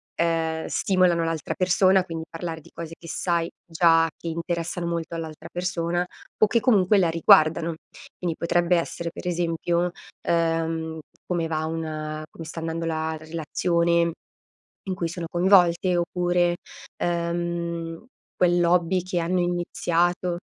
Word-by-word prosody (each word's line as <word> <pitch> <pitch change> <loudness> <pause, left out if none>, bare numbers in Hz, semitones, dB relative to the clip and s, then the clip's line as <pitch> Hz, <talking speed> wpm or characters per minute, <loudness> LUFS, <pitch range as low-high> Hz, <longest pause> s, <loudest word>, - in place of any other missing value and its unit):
ehm, 165 -1 0
stimolano 180 -3 +2
l'altra 165 -3 -2
persona, 185 +1 +4
quindi 165 -3 -6
parlare 165 -1 -5
di - - -17
cose 165 0 -7
che 165 - -12
sai 170 0 0 0.2
già 165 -1 +4
che 170 - -8
interessano 170 +1 -3
molto 170 0 -3
all'altra 160 -1 -6
persona, 175 0 -1 0.3
o 215 - +5
che 235 +3 +2
comunque 210 -5 +4
la 180 -4 +3
riguardano, 165 0 +4 0.4
quindi 170 -3 -2
potrebbe 175 +1 +2
essere 170 0 -3
per - - -9
esempio, 170 0 0 0.4
uhm, 165 -1 0 0.3
come 170 -2 0
va 155 -1 -1
un 155 -1 -4
come 165 - -9
sta 165 +1 -6
andando 165 +1 -3
la 160 0 -1
relazione 170 +2 +1 0.8
in 185 - 0
cui 170 -2 -2
sono 170 0 -5
coinvolte, 180 0 +4
oppure, 175 0 +1 0.5
uhm, 170 0 -2 0.3
quell'hobby 175 0 +3
che 180 -2 -1
hanno 180 +2 0
iniziato 175 0 0
170 Hz, 130 wpm, -25 LUFS, 165-175 Hz, 0.8 s, o